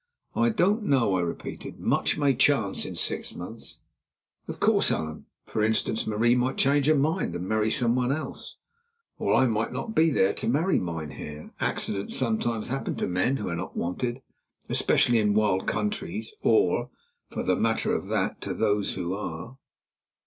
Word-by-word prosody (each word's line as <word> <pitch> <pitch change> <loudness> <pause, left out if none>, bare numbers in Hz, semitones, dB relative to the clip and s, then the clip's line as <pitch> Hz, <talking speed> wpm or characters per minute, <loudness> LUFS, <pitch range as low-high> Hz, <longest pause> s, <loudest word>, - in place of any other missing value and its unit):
"I 235 - +3
don't 210 0 +2
know," 135 - +2
I 90 - +1
repeated. 85 -1 -5
"Much - - +1
may 140 -2 +3
chance 120 -6 +2
in - - -6
six - - -2
months." 110 +6 -7 0.7
"Of - - -6
course, - - +3
Allan. 80 0 -3 0.2
For 110 - -2
instance, 110 0 +1
Marie 110 +3 +3
might 125 +1 0
change 140 +1 +3
her 155 - +5
mind 150 - 0
and 90 +1 -4
marry 110 +1 +1
someone 125 +2 +2
else." 155 +3 -5 0.6
"Or - - +2
I 130 - +5
might 115 -2 0
not 220 - -4
be 160 -2 +4
there 100 -9 +2
to - - -4
marry, 160 +10 +2
mynheer. 75 -3 -6
Accidents 100 0 -1
sometimes 115 -2 0
happen 135 +2 -2
to - - -1
men 90 +10 +1
who 105 - -4
are 85 - -2
not 85 +3 -6
wanted, 120 +9 -2 0.5
especially 120 -1 +3
in 105 -1 +2
wild 105 -3 +2
countries 170 - -2
or, 420 - +3 0.4
for - - -4
the - - +2
matter - - +1
of - - -2
that, - - -1
to - - -4
those 105 -2 +1
who 90 -1 -2
are." 100 +5 -6
115 Hz, 170 wpm, -27 LUFS, 100-135 Hz, 0.7 s, her